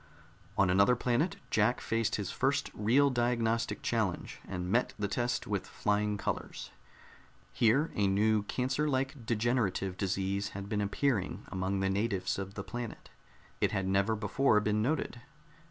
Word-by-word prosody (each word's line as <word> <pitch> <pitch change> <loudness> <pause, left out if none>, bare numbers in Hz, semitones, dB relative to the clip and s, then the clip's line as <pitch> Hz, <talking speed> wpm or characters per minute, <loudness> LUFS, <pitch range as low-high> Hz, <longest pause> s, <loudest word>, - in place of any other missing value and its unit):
On 100 -3 +4
another 100 +6 +5
planet 125 +8 +1 0.2
Jack 110 +4 +3
faced 115 0 0
his 100 -3 -3
first 140 +2 0
real 130 +7 +3
diagnostic 115 -2 0
challenge 110 -6 -1
and 90 -1 -4
met 120 +3 +1
the 100 -1 -1
test 120 +4 -1
with - - -2
flying 105 0 0
colors. - - -4 0.8
Here 120 - +3
a 100 -1 +2
new 105 +2 +3
cancer 130 +7 -1
like 130 -3 -2
degenerative 110 -5 0
disease 100 +1 -1
had 100 0 -6
been 105 0 -1
appearing 105 0 -1
among 95 +1 -1
the 95 - +1
natives 100 -1 -1
of 95 +1 -6
the 100 - -4
planet. 120 0 -7 0.5
It - - +1
had 95 - 0
never 100 +3 +2
before 110 +2 +2
been 105 0 +1
noted. 125 -1 -1
110 Hz, 150 wpm, -31 LUFS, 100-120 Hz, 0.8 s, another